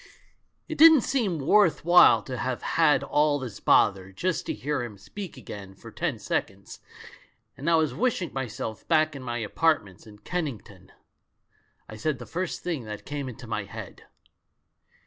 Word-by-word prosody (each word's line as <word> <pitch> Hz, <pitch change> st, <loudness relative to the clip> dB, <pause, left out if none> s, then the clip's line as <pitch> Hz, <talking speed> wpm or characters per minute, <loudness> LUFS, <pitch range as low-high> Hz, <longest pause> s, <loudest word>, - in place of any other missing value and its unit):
It 315 Hz, -, -6 dB
didn't 320 Hz, -3 st, +9 dB
seem 230 Hz, -11 st, 0 dB
worth 165 Hz, +4 st, +3 dB
while 175 Hz, +1 st, +7 dB
to 130 Hz, -, -6 dB
have 125 Hz, +1 st, -3 dB
had 150 Hz, -5 st, +3 dB
all 145 Hz, +1 st, +2 dB
this 125 Hz, -7 st, -7 dB
bother 95 Hz, -1 st, +3 dB
just 170 Hz, -, -2 dB
to -, -, -1 dB
hear 145 Hz, -1 st, -2 dB
him 115 Hz, -4 st, -7 dB
speak 185 Hz, -, -9 dB
again 100 Hz, -6 st, -9 dB
for -, -, -13 dB
ten -, -, -2 dB
seconds, 100 Hz, 0 st, -4 dB, 0.8 s
and 140 Hz, +5 st, -3 dB
I 170 Hz, -, +5 dB
was 155 Hz, -5 st, +1 dB
wishing 185 Hz, -, -1 dB
myself 115 Hz, -4 st, -5 dB
back 155 Hz, -2 st, +2 dB
in 135 Hz, -, -7 dB
my 120 Hz, -2 st, -4 dB
apartments 115 Hz, -, -1 dB
in 105 Hz, -1 st, -14 dB
Kennington. 145 Hz, -, -6 dB, 1.0 s
I 110 Hz, -, -10 dB
said 140 Hz, +6 st, -1 dB
the 120 Hz, -, -9 dB
first 180 Hz, 0 st, -4 dB
thing 160 Hz, -9 st, -3 dB
that 105 Hz, -1 st, -8 dB
came 145 Hz, -2 st, -4 dB
into 125 Hz, +1 st, -10 dB
my 110 Hz, -3 st, -3 dB
head. -, -, -10 dB
140 Hz, 165 wpm, -26 LUFS, 110-165 Hz, 1.0 s, didn't